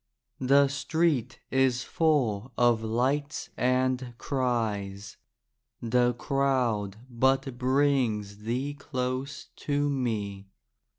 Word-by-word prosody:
The 140 +2 +5
street 140 -3 0
is 130 -1 +2
full 130 -8 +1
of 120 -2 +4
lights 130 +7 -1
and 125 -1 0
cries. 105 -7 -2 0.6
The 120 +1 +2
crowd 125 -7 0
but 130 +1 +1
brings 125 -6 +1
thee 125 +6 -2
close 130 0 -4
to 145 0 0
me. 105 -7 -2
125 Hz, 85 wpm, -28 LUFS, 115-140 Hz, 0.6 s, The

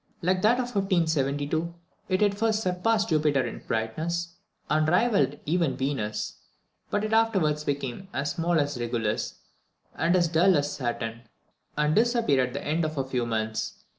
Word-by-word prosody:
Like 185 +1 +2
that 215 +4 +5
of 245 -1 -3
1572, 160 -4 0 0.3
it 185 +2 +2
at 205 -1 +3
first 220 +1 0
surpassed 210 +4 +1
Jupiter 150 -5 +2
in 120 - -6
brightness, 165 +10 -2 0.3
and 155 +1 +2
rivalled 205 +5 +2
even 165 -3 +1
Venus, 130 -6 -3 0.5
but 205 0 0
it 215 0 -2
afterwards 190 -10 +2
became 140 +4 -3
as 140 +2 -2
small 170 0 +1
as 145 -3 -1
Regulus, 115 -2 -2 0.5
and 175 +2 +2
as 175 -2 +3
dull 170 +2 +4
as 145 0 -1
Saturn, 115 -2 -4 0.5
and 150 0 +2
disappeared 225 - +3
at 125 - -10
the 140 - -5
end 160 +3 0
of 155 -1 -3
a 135 - +1
few 125 -2 -1
months. 110 -1 -3
155 Hz, 160 wpm, -27 LUFS, 135-185 Hz, 0.5 s, that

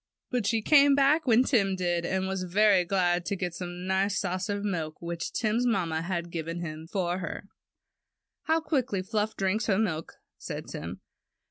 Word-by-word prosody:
But 245 -5 0
she 225 0 +1
came 285 0 +6
back 285 +2 +3
when 235 +1 +5
Tim 200 -8 +2
did, 175 -2 -1
and 190 0 -1
was 190 -1 -2
very 190 +1 +4
glad 175 -1 +1
to 200 - 0
get 180 -2 -3
the 180 - -4
nice 190 +3 -1
saucer 195 +2 -2
of 200 - -5
milk 165 -6 -3
which 170 0 -4
Tim's 230 +2 0
mamma 170 -8 0
had 170 -1 -3
given 165 +1 -4
him 160 -1 -6
for 180 -2 -1
her. 185 +2 -6 1.0
^^How 320 0 +3
quickly 260 - 0
Fluff 215 +2 -1
drinks 205 +3 0
her 195 -3 +3
milk," 175 -7 -1 0.3
said - - -6
Tim. - - -7
190 Hz, 175 wpm, -28 LUFS, 175-220 Hz, 1.0 s, came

